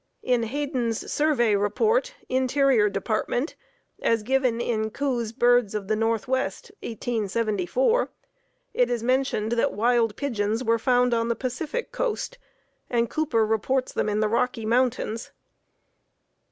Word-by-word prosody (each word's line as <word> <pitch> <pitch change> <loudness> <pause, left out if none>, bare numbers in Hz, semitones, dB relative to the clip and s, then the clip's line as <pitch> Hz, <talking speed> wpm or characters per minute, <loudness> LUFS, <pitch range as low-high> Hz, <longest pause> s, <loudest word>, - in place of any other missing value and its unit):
In 250 -2 +2
Hayden's 245 -2 -2
Survey 255 -8 +2
Report, 445 - +1
Interior 260 -3 +3
Department, 220 - -1 0.5
as 230 -2 +1
given 255 -1 +1
in 220 -2 -1
Coues' 240 -2 -2
"Birds 240 -3 +3
of 200 -2 -3
the 215 - +1
Northwest," 230 - -1
1874, 230 - 0 0.6
it 245 -1 +2
is 240 -2 -1
mentioned 255 -4 0
that 235 -1 +1
wild 230 0 +2
pigeons 225 -3 -1
were 230 -1 +2
found 250 +1 +3
on 230 0 +1
the 235 - 0
Pacific 285 - -4
coast, - - -3 0.5
and 235 -1 0
Cooper 270 -8 +1
reports 240 +4 0
them - - 0
in 210 +1 0
the 215 - +3
Rocky 230 +1 0
Mountains. 235 -1 0
235 Hz, 125 wpm, -25 LUFS, 220-260 Hz, 0.6 s, Interior